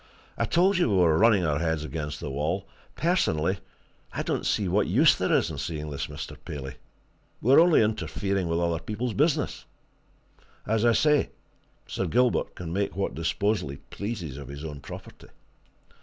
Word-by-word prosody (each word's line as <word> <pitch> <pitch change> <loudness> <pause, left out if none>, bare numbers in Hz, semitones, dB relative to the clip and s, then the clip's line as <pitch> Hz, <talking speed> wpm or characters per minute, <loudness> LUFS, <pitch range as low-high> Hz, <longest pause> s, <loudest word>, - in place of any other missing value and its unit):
I - - 0
told 185 +2 +3
you 175 - +3
we 100 - +2
were 85 -4 +4
running 105 -5 +5
our 75 -2 +1
heads 80 -2 0
against 75 -1 -5
the 75 - -5
wall 80 +8 -2 0.3
personally, 100 - +1 0.5
I - - -3
don't - - -1
see 100 - +1
what 100 +4 +2
use 135 - +5
there 95 - -1
is - - +2
in 70 - -6
seeing 75 +1 -4
this 70 - -3
Mr. - - -7
Paley. 65 -3 -7 0.6
We're 130 +6 +6
only 165 -7 +6
interfering 100 -3 -1
with 85 0 0
other 85 -1 0
people's 110 +7 -3
business. 150 +1 0 1.0
As 110 +1 +1
I 120 - +5
say, 150 +3 +3 0.6
Sir - - -3
Gilbert 125 0 +1
can 85 -2 -6
make 100 +1 -1
what 100 0 -1
disposal 85 +2 0
he 70 - -6
pleases 85 - -6
of 70 -3 -8
his 70 +3 -7
own 75 -2 -6
property." - - -11
95 Hz, 170 wpm, -27 LUFS, 75-115 Hz, 1.0 s, We're